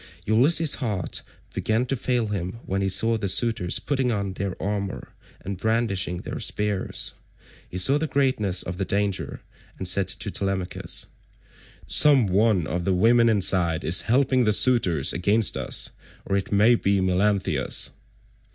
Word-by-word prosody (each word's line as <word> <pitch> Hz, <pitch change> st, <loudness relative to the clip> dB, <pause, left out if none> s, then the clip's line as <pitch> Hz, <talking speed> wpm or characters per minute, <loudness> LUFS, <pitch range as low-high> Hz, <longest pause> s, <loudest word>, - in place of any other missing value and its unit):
Ulysses' 145 Hz, +8 st, +3 dB
heart 105 Hz, -8 st, -2 dB, 0.3 s
began 110 Hz, +3 st, -1 dB
to 135 Hz, -, -1 dB
fail 120 Hz, -3 st, -1 dB
him 95 Hz, -2 st, -4 dB
when 95 Hz, +1 st, -2 dB
he 95 Hz, -, 0 dB
saw 115 Hz, +4 st, +1 dB
the 100 Hz, -, -2 dB
suitors171 95 Hz, -3 st, 0 dB
putting 135 Hz, -3 st, 0 dB
on 100 Hz, -3 st, -3 dB
their 95 Hz, 0 st, -5 dB
armour 100 Hz, -1 st, -4 dB, 0.3 s
and 95 Hz, -1 st, -6 dB
brandishing 110 Hz, -6 st, -1 dB
their -, -, -7 dB
spears. 105 Hz, -2 st, -2 dB, 0.6 s
He 90 Hz, -, -7 dB
saw 135 Hz, +11 st, +3 dB
the 160 Hz, -, -2 dB
greatness 130 Hz, -10 st, 0 dB
of 90 Hz, 0 st, -6 dB
the 95 Hz, -, -2 dB
danger, 100 Hz, +1 st, -2 dB, 0.4 s
and 95 Hz, -, -3 dB
said 95 Hz, +1 st, +3 dB
to -, -, -2 dB
Telemachus, 95 Hz, -2 st, -2 dB, 0.8 s
"Some 140 Hz, -5 st, +5 dB
one 100 Hz, -2 st, +1 dB
of 85 Hz, +3 st, -3 dB
the 95 Hz, +1 st, 0 dB
women 115 Hz, +4 st, +4 dB
inside 90 Hz, -5 st, +2 dB
is 85 Hz, -, +3 dB
helping 130 Hz, +1 st, +2 dB
the 105 Hz, -2 st, +2 dB
suitors 95 Hz, -, +3 dB
against 100 Hz, +5 st, +2 dB
us, -, -, -1 dB, 0.3 s
or 100 Hz, -, -1 dB
it 100 Hz, -, -3 dB
may 105 Hz, +4 st, +4 dB
be 100 Hz, -4 st, +1 dB
Melanthius." 95 Hz, +2 st, 0 dB
100 Hz, 150 wpm, -24 LUFS, 95-115 Hz, 0.8 s, Some